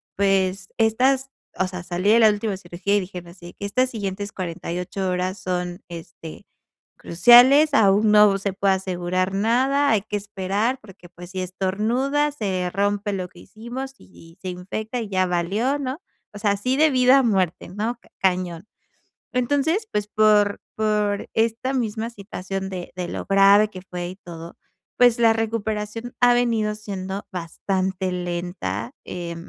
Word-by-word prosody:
pues, 195 -1 +1
estas, 255 +4 +2 0.3
o 185 - +1
sea, 180 -1 -7
salí 180 +3 -1
de 230 - +6
la 220 -1 +7
última 210 -1 -1
cirugía 185 +2 -2
y 205 - +2
dijeron 180 -2 -8
así, 175 -1 -12
que: 200 - -7
"Estas 255 +6 +1
siguientes 205 -2 -4
48 180 +1 -4
horas 180 +2 -1
son, 180 0 -3
este, 165 -1 -10 0.5
cruciales, 245 - +6
aún 210 -2 +4
no 210 -1 +6
se 195 0 -2
puede 195 0 +2
asegurar 185 0 -2
nada, 260 +7 +2
hay 210 -3 +2
que 210 0 -4
esperar 205 +4 -2
porque, 190 -4 -15
pues 175 +1 -12
si 185 0 -4
estornuda, 220 +11 0
se 190 -10 -2
rompe 205 +1 -1
lo 185 -2 -3
que - - -17
hicimos, 250 +5 -7
y 165 -2 -17
se 185 - -4
infecta 215 +6 -5
y 220 - -5
ya 185 -1 +1
valió", 195 +11 0
¿no? 275 +2 -4 0.3
O - - -7
sea, 205 -1 +2
así 250 +7 -1
de 310 +1 +4
vida 255 0 +5
a - - +4
muerte, 190 -7 0
¿no? 220 +5 -3 0.2
Cañón. 180 0 -1 0.7
Entonces, 290 - +1
pues, 210 0 -1
por 210 -1 +3
por 210 -2 0
esta 230 +4 0
misma 230 -2 -2
situación 195 -3 -6
de 180 -2 -6
de 180 -1 -4
lo - - -5
grave 200 +2 +5
que 185 -3 -10
fue 180 -2 -6
y 185 - -8
todo, 170 -3 -10 0.4
pues, 245 -1 +5
la 230 -1 +5
recuperación 225 +1 -3
ha 245 0 +6
venido 230 -3 +1
siendo 195 -2 -6
bastante 185 +1 -2
lenta. 175 - -4
Eh, 170 -1 -5
200 Hz, 160 wpm, -23 LUFS, 185-225 Hz, 0.7 s, la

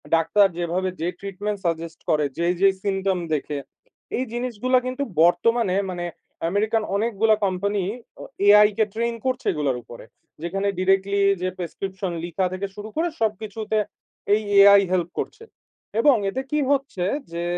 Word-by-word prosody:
Doctor 180 +5 +4
যেভাবে 175 +2 -1
যে 170 - 0
treatment 200 +1 -4
suggest 165 -1 -2
করে, 150 -2 +3
যেই, 170 +1 +1
যেই 195 -1 +6
সিম্পটম 195 -2 0
দেখে, 150 0 -2 0.6
এই 255 - -1
জিনিসগুলা 250 +1 0
কিন্তু 255 +2 -2 0.2
বর্তমানে, 190 +3 +3
মানে 175 -1 -4 0.4
আমেরিকান 215 +3 +1
অনেকগুলা 220 0 +2
কোম্পানি 195 +1 -1 0.4
অ - - -7 0.2
AI 210 0 +8
কে 220 - +4
ট্রেইন 235 +1 -1
করছে 260 0 -1
এগুলোর 140 -4 -1
উপরে। 120 0 -12 0.4
যেখানে 195 +4 -1
ডিরেক্টলি 195 +1 +2 0.2
যে 185 - 0
প্রেসক্রিপশন 190 +2 -4
লিখা 175 +2 -1
থেকে 195 +2 -3
শুরু 210 +1 -7
করে, 330 +2 +1
সবকিছুতে 215 0 -2 0.6
এই 215 - +3 0.2
AI 200 0 +8
হেল্প 175 -2 +1
করছে। 445 +1 -5 0.6
এবং 275 +1 +6
এতে 260 +6 -3
কি 300 - +1
হচ্ছে? 270 -10 0 0.3
যে, 170 0 -3
200 Hz, 145 wpm, -23 LUFS, 180-220 Hz, 0.6 s, AI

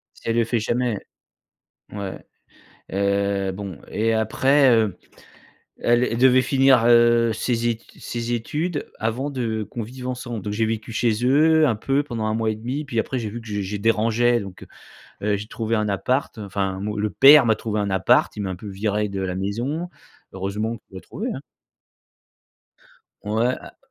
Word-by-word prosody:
Si - - -20
elle 115 - +1
le 120 - +3
fait 115 0 0
jamais. 120 0 -1 0.9
Ouais. 100 -2 -5 0.7
Heu, 100 0 0
bon 95 -3 -7
et, 115 +1 0
heu - - +2
après, 135 +5 +3
heu 110 -5 +2 0.8
elle 120 +1 +3
elle 115 -2 -1
devait 130 +1 +5
finir, 130 -2 +4
heu, 120 -1 +5
ses 120 +1 0
ét 115 -1 -3 0.2
ses 120 0 -4
études 150 +7 -3
avant 115 +6 -2
de 115 -5 -2
qu'on 115 - -5
vive 125 +3 -8
ensemble. 120 -3 -4
Donc 105 +1 -3
j'ai 110 +1 +1
vécu 110 +1 -3
chez 115 0 0
eux 155 +4 +4
un 115 - +1
peu 135 +6 0
pendant 120 -6 -4
un 110 - 0
mois 110 0 0
et 110 - -1
demi, 125 +7 -4
puis 120 -6 -2
après 130 +3 -2
j'ai 110 -3 -4
vu 115 +3 -6
que 115 - -14
j'ai 105 -1 -2
je 100 +2 -4
dérangeais 115 +3 +2
donc, 100 -3 -9 0.6
heu 105 +1 +1
heu, - - +2
j'ai 105 +2 -7
trouvé 115 0 -2
un 105 -1 0
appart. 125 +6 -1
Enfin, 95 -2 -3
mon 105 +1 -3
le 105 0 -1
père 140 +3 +8
m'a 110 -2 +3
trouvé 110 -2 -2
un 100 -1 -1
appart. 95 -1 +3
Il 105 - -3
m'a 95 - -3
un 90 - -4
peu 105 +3 -9
viré 105 +1 -1
de 100 -1 -4
la 95 -1 -2
maison. 120 - -3 0.4
Heureusement 105 +4 -3
qu'il 95 - -13
a - - -6
trouvé - - -6
hein? - - -6 1.8
Ouais 115 +4 +1
a - - -13
115 Hz, 190 wpm, -23 LUFS, 105-125 Hz, 1.8 s, père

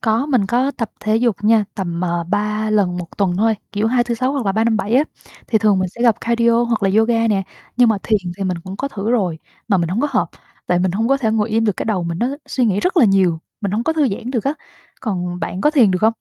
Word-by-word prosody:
có, 225 +4 +1
mình 250 -9 +1
có 250 +6 +1
tập 230 -6 -4
thể 215 +1 +1
dục 235 -2 +1
nha. 220 0 +4
Tầm, 175 -3 -3
à, 170 -1 -1
3 210 +1 -1
lần 195 -4 +1
1 175 - -5
tuần 185 -3 +1
thôi, 220 +3 +2 0.2
kiểu 210 +1 0
hai, 240 +1 +2
tư, 240 0 -2
sáu 255 +3 -1
hoặc 270 -7 -2
là 195 - +2
ba, 220 +2 +1
năm, 230 -1 +2
bảy 220 +1 -1
á, 270 - +5 0.4
thì 220 - +2
thường 205 -2 +3
mình 185 - 0
sẽ 235 - -13
tập 230 -2 +5
Cardio 235 0 +2
hoặc 235 -3 -1
là 195 - +3
yoga 230 0 +2
nè. 195 -2 +1 0.3
Nhưng 245 -1 +5
mà 220 -2 +2
thiền 215 -2 +2 0.2
thì 195 - -3
mình 180 -2 -1
cũng 190 +1 -7
có 275 - -3
thử 215 -3 -3
rồi, 190 -9 0 0.3
mà 200 - +3
mình 170 -2 0
hổng 190 +7 -1
có 295 - +1
hợp, - - +1 0.4
tại 180 - +2
mình 185 0 +1
hông 225 +5 0
có 275 - +4
thể 230 -5 0
ngồi 220 0 0
im 225 +1 +1
được, 210 -4 0
cái - - -3
đầu 200 -5 -1
mình 170 0 -3
nó 240 - +1 0.2
suy 255 - 0
nghĩ 205 -3 +1
rất 365 0 -1
là 295 - +6
nhiều, 190 -5 +3 0.2
mình 200 - -2
hổng 220 +3 -1
có 320 - +1
thư 305 -5 +2
giãn 225 +5 -5
được 235 -5 -2
á. 275 +2 0 0.5
Còn 180 -5 -3
bạn 180 +3 -4
có 300 - +3
thiền 250 - +4
được 185 - 0
không? 220 +1 +4
215 Hz, 290 wpm, -19 LUFS, 195-235 Hz, 0.5 s, là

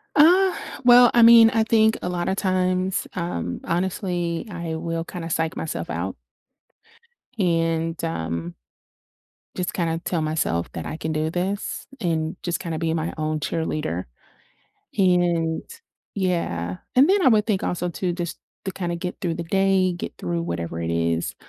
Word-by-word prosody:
Uh, 360 +5 +6 0.3
well, 245 0 +8
I 240 - +5
mean, 230 -1 +9
I 225 -3 +2
think 220 0 +3
a - - -2
lot 175 -1 -2
of 190 - +1
times, 185 -1 0
um, 130 - -3
honestly, 175 -1 -1
I 170 -2 -4
will 165 +1 -3
kinda 170 -2 -6
psych 160 0 -1
myself 160 - -4
out - - -3 1.2
and, 165 -3 0
um 85 - -3 1.0
just 180 -1 -2
kinda 165 -2 -1
tell 170 -3 0
myself 155 - -1
that 80 - -5
I - - -4
can 160 0 -3
do 155 0 0
this 185 +4 -3
and 160 -3 -1
just 175 -1 -1
kinda 165 -3 -4
be 165 -1 0
my 165 0 -2
own 155 0 -1
cheerleader. 150 - -2 0.9
And 175 -4 +2 0.5
Yeah, 130 - -1 0.2
and 270 +5 +6
then 400 +1 +4
I - - +4
would 215 -2 +4
think 200 -4 0
also 180 0 -1
too 175 +1 -2
just 175 -1 -5 0.3
to 190 - -2
kinda 175 -2 -3
get 180 +1 -5
through 170 -4 -1
the 170 - -4
day, 190 0 +2
get 175 - -6
through 85 -1 -2
whatever 85 -1 -4
it 85 - -2
is, 85 0 0
170 Hz, 160 wpm, -23 LUFS, 160-190 Hz, 1.2 s, mean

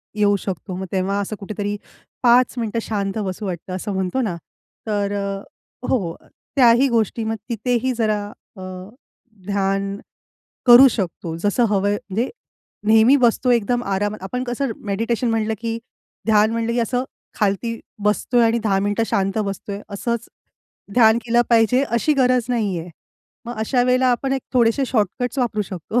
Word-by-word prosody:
येऊ 205 -1 +3
शकतो, 190 0 -5
मग 190 +1 -4
तेव्हा 195 +1 0
असं 210 +2 -4
कुठेतरी 205 0 -3 0.5
5 245 +1 +5
मिनिटं 230 -1 -1
शांत 200 -1 -2
बसू 190 +2 -4
वाटतं, 185 -1 -5
असं 200 +2 -4
म्हणतो 190 +6 -1
ना, 205 -7 -1 0.5
तर 205 -2 0
अ, 200 -1 -3 0.5
हो, 195 -10 0
अ, - - -24 0.3
त्याही 250 0 +6
गोष्टी 230 -1 0
मग 225 0 -1
तिथेही 245 +2 0
जरा 215 -3 +1 0.3
अ, - - -9 0.9
ध्यान 195 0 0 0.7
करू 245 +2 +10
शकतो, 170 -5 -4
जसं 205 +6 +1
हवंय 200 0 +1 0.2
म्हणजे 225 +7 -1 0.6
नेहमी 225 +5 +6
बसतो 250 -1 +2
एकदम 240 +1 +2
आरामात 205 +1 -1
आपण 250 +6 -3
कसं 245 +1 -2 0.2
मेडिटेशन 230 +4 0
म्हटलं 220 -1 0
की 230 0 -2 0.5
ध्यान 215 -1 +4
म्हटलं 230 0 -1
की 240 - -1
असं 245 +2 0 0.3
खालती 215 +3 0 0.2
बसतोय 225 +4 +2
आणि 230 +1 +2
10 195 -3 +2
मिनिटं 205 +3 0
शांत 195 +1 0
बसतोय, 200 0 -4
असंच 230 +3 -3 0.7
ध्यान 225 -2 +6
केलं 240 +1 +3
पाहिजे 230 +3 +4
अशी 235 +7 +2
गरज 255 -3 +3
नाही 215 -7 0
आहे. 165 +2 -7 0.6
मग 240 0 -5
अशा 245 +3 +1
वेळेला 255 +1 +3
आपण 265 +2 -1
एक 270 -2 -1
थोडेसे 240 +2 +3
शॉर्टकट 245 +3 -1
वापरू 230 -4 0
शकतो. 195 +4 -3
220 Hz, 155 wpm, -21 LUFS, 200-240 Hz, 0.9 s, करू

